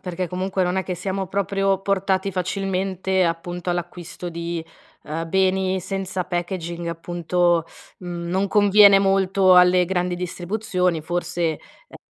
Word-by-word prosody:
perché 180 0 -4
comunque 185 +1 -2
non 180 +1 -1
è 190 - +1
che 185 - -3
siamo 190 +2 -3
proprio 195 -1 0
portati 195 0 0
facilmente, 190 0 -1
appunto, 175 +1 -3
all'acquisto 175 0 -5
di, 170 0 -4 0.4
uhm, 165 +2 -4
beni 190 0 +1
senza 190 0 -3
packaging 175 -1 -4
appunto, 175 0 0 0.4
mhmm, 175 -1 -6
non 190 +3 0
conviene 205 0 +6
molto 195 -1 +3
alle 180 0 +5
grandi 180 0 -1
distribuzioni, 180 0 -2
forse 175 0 -1 0.4
a - - -13
180 Hz, 130 wpm, -22 LUFS, 175-190 Hz, 0.4 s, conviene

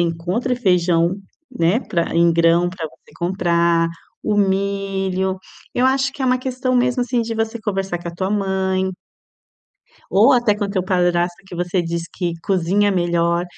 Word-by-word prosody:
encontre 175 +9 -1
feijão, 180 -5 +2 0.3
né, 205 -2 +1
pra 170 -10 -2
em 170 0 +4
grão 170 +1 +3
pra 175 -3 -5
você 150 - -19
comprar, 170 -2 +1 0.3
o 210 -1 0
milho. 195 -1 0 0.4
Eu 250 - +2
acho 265 +1 +2
que 270 - -6
é - - +1
uma 255 0 +2
questão, 255 0 -2
mesmo, 250 0 +2
assim, 245 0 0
de 225 0 -3
você 225 +1 -2
conversar 195 -4 -2
com 170 - -5
a 170 - -7
tua 190 +2 -2
mãe. 190 -2 0 1.2
Ou 225 +8 +5
até 240 -4 +3
com 205 0 -2
o 200 - -3
teu 190 -2 0
padrasto, 175 -1 +1
que 180 - -9
você 175 +1 -1
diz 170 0 -3
que 175 -2 -2
cozinha 195 +2 +2
melhor 170 -1 +1
190 Hz, 170 wpm, -20 LUFS, 175-215 Hz, 1.2 s, Ou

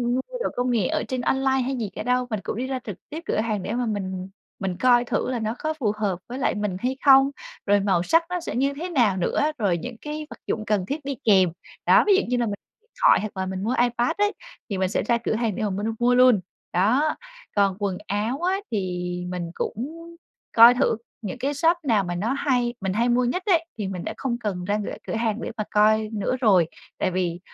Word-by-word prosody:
mua - - -4
đồ - - 0
công 245 0 0
nghệ 215 -7 +2
ở - - -1
trên 255 +1 -2
online 265 +1 +1
hay 265 +2 -2
gì 225 -5 -3
cả - - -5
đâu, 250 0 +1
mình 215 -3 -2
cũng - - -4
đi 255 +2 -2
ra 260 -1 -2
trực 205 -5 -6
tiếp 315 +3 -6
cửa - - -1
hàng 215 -3 -1
để - - -3
mà 245 +1 0
mình 190 -3 -3 0.3
mình 190 -3 -3
coi 245 +1 +4
thử - - -1
là 245 - -1
nó 220 +1 -2
có 310 0 -1
phù 255 -10 0
hợp 200 -5 -1
với 250 - -5
lại - - +1
mình 205 -3 -2
hay 255 +4 -1
không, 270 0 +7 0.3
rồi 205 0 +4
màu 190 -3 +1
sắc 330 - +3
nó 360 0 -1
sẽ 340 - -5
như 275 +3 +1
thế 330 +6 -5
nào 235 - +2
nữa, 290 - +1
rồi 200 -7 +1
những 245 +8 -6
cái 300 0 -5
vật - - -11
dụng 215 -1 -2
cần 205 -3 0
thiết 285 +6 -4
đi 280 -1 -2
kèm. 190 -5 +5 0.4
Đó, - - +6
ví 400 - +6
dụ - - +3
như 250 - 0
là 240 - +1
mình 210 - -2 0.5
thoại - - +6
hoặc 210 -2 -6
là 190 - -1
mình 190 0 -4
mua 235 +4 0
iPad 240 0 +2
ấy, 415 +1 +2 0.4
thì 195 - -2
mình 185 -1 +1
sẽ - - 0
ra 235 - +2
cửa 235 - -2
hàng 225 -3 -1
để - - -3
mà 210 - +1
mình 200 +2 -3
mua 245 +1 +3
luôn, 250 -5 +6 0.3
đó. 245 - +2 0.4
Còn 200 -2 +3
quần 200 -3 -1
áo 215 +8 -1
á, 370 +2 +1
thì 215 - 0 0.5
mình 175 -2 -4
cũng 230 +6 -3 0.7
coi 235 +1 +9
thử 245 -3 +1 0.2
những 205 -1 -5
cái 275 +3 -1
shop 330 +4 +3
nào 220 -7 +2
mà 175 -1 -3
nó 220 +9 -1
hay 250 -4 0
mình 190 -1 -1
hay 235 +4 +1
mua 245 +1 +3
nhất 250 +10 -1
ấy 335 -5 +3
thì 205 - -3
mình 185 -2 -5
đã - - -4
không 245 -3 -2
cần 205 -6 -3
ra 205 +2 0
cửa - - -4
cửa - - -3
hàng 225 -1 -1
để - - -4
mà 215 - -1
coi 215 +1 +3
nữa 215 +4 -1
rồi, 190 -8 +5 0.3
tại - - 0
vì 175 -1 -1
230 Hz, 250 wpm, -24 LUFS, 200-260 Hz, 0.7 s, coi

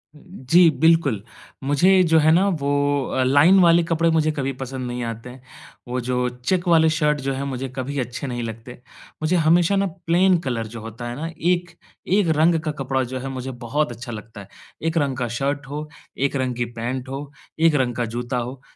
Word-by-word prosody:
जी, 170 +1 +3
बिल्कुल। 160 -10 +3 0.4
मुझे 175 +8 +4
जो 160 -2 +4
है 155 +1 +4
ना 185 +5 +4
वो 140 0 -2 0.4
अ, 130 - -1
लाइन 145 +9 +5
वाले 170 -1 +5
कपड़े 165 0 +1
मुझे 155 -1 +2
कभी 135 -3 -2
पसंद 130 -1 -5
नहीं 120 0 -4
आते 115 +1 -6
हैं। 125 +1 -12 0.5
वो 125 +1 -2
जो 125 0 0
चेक 175 +10 -2
वाले 160 -2 +5
शर्ट 150 -1 +1
जो 135 0 -2
है 135 +1 -3
मुझे 135 -1 -4
कभी 140 +2 -3
अच्छे 125 +3 -4
नहीं 120 -2 -4
लगते। 115 +2 -8 0.4
मुझे 155 +3 +1
हमेशा 170 +3 +3
ना 200 0 +2 0.2
प्लेन 180 +2 +4
कलर 115 -3 -2
जो 115 +1 -9
होता 115 +2 -7
है 120 - -5
ना 155 +5 -4 0.2
एक, 175 -1 -1 0.4
एक 195 0 +2
रंग 165 +1 +4
का 155 -1 -2
कपड़ा 130 0 0
जो 130 +1 -5
है 135 +2 -5
मुझे 130 0 -5 0.2
बहुत 150 +2 0
अच्छा 120 +1 -8
लगता 110 -1 -9
है। 100 - -13 0.4
एक 165 +1 -1
रंग 140 -4 0
का 125 -2 -1
शर्ट 140 0 -2
हो, 150 +2 -5 0.3
एक 140 +1 0
रंग 130 -2 -1
की 120 0 -1
पैंट 130 +3 -4
हो, 140 +1 -6 0.3
एक 165 -1 +4
रंग 125 -4 0
का 120 - -1
जूता 120 +1 -2
हो, 125 +2 -5
135 Hz, 210 wpm, -22 LUFS, 125-160 Hz, 0.5 s, लाइन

